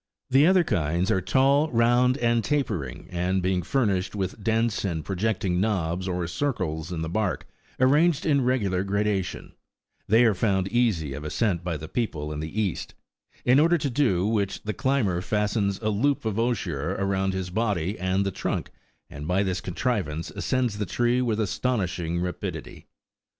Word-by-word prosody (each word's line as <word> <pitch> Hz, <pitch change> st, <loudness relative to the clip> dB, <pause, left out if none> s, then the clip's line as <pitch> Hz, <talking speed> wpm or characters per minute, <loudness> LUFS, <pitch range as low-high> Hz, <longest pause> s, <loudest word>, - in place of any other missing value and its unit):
The 135 Hz, +4 st, +6 dB
other 185 Hz, -1 st, +5 dB
kinds 85 Hz, -, 0 dB
are 95 Hz, -, +2 dB
tall, 140 Hz, -, +3 dB
round, 120 Hz, +1 st, +3 dB
and 120 Hz, -3 st, +1 dB
tapering; 105 Hz, -, -2 dB
and 90 Hz, +2 st, 0 dB
being 90 Hz, 0 st, 0 dB
furnished 100 Hz, -3 st, 0 dB
with 95 Hz, +1 st, -4 dB
dense 115 Hz, -1 st, +1 dB
and 85 Hz, -6 st, -2 dB
projecting 95 Hz, -2 st, 0 dB
knobs 95 Hz, -4 st, -1 dB
or 90 Hz, -1 st, -1 dB
circles 85 Hz, -, -2 dB
in 80 Hz, -2 st, -3 dB
the -, -, -3 dB
bark, 100 Hz, +2 st, -1 dB, 0.3 s
arranged 150 Hz, +5 st, +3 dB
in 140 Hz, -4 st, +3 dB
regular 100 Hz, -8 st, +1 dB
gradation, 100 Hz, -1 st, -2 dB, 0.5 s
they 115 Hz, +4 st, +5 dB
are 110 Hz, -, +4 dB
found 95 Hz, -1 st, +1 dB
easy 105 Hz, -, +1 dB
of 75 Hz, +2 st, -6 dB
ascent 90 Hz, +2 st, 0 dB
by 85 Hz, -3 st, -2 dB
the 80 Hz, +2 st, -8 dB
people 75 Hz, -9 st, -3 dB
in 75 Hz, -, -5 dB
the 80 Hz, +7 st, -4 dB
East; 100 Hz, -6 st, -2 dB, 0.5 s
in 125 Hz, +3 st, +5 dB
order 170 Hz, +3 st, +4 dB
to 140 Hz, -3 st, -2 dB
do 115 Hz, -9 st, +2 dB
which, 105 Hz, -3 st, -1 dB
the 105 Hz, -, -2 dB
climber 110 Hz, -11 st, 0 dB
fastens 105 Hz, 0 st, 0 dB
a 110 Hz, -, +1 dB
loop 125 Hz, +6 st, +1 dB
of 110 Hz, 0 st, -1 dB
osier 95 Hz, -, -1 dB
round 95 Hz, 0 st, 0 dB
his 95 Hz, -1 st, -3 dB
body 100 Hz, -3 st, -1 dB
and 95 Hz, +2 st, 0 dB
the 95 Hz, -, -1 dB
trunk, -, -, -3 dB, 0.4 s
and 75 Hz, +2 st, -8 dB
by 95 Hz, +3 st, +2 dB
this 95 Hz, -2 st, -2 dB
contrivance 90 Hz, -, -2 dB
ascends 125 Hz, -5 st, -1 dB
the 105 Hz, -, -2 dB
tree 120 Hz, +5 st, +1 dB
with 115 Hz, -3 st, 0 dB
astonishing 95 Hz, -6 st, -1 dB
12 85 Hz, +1 st, -1 dB
rapidity. 90 Hz, -1 st, -6 dB
100 Hz, 170 wpm, -26 LUFS, 90-120 Hz, 0.5 s, The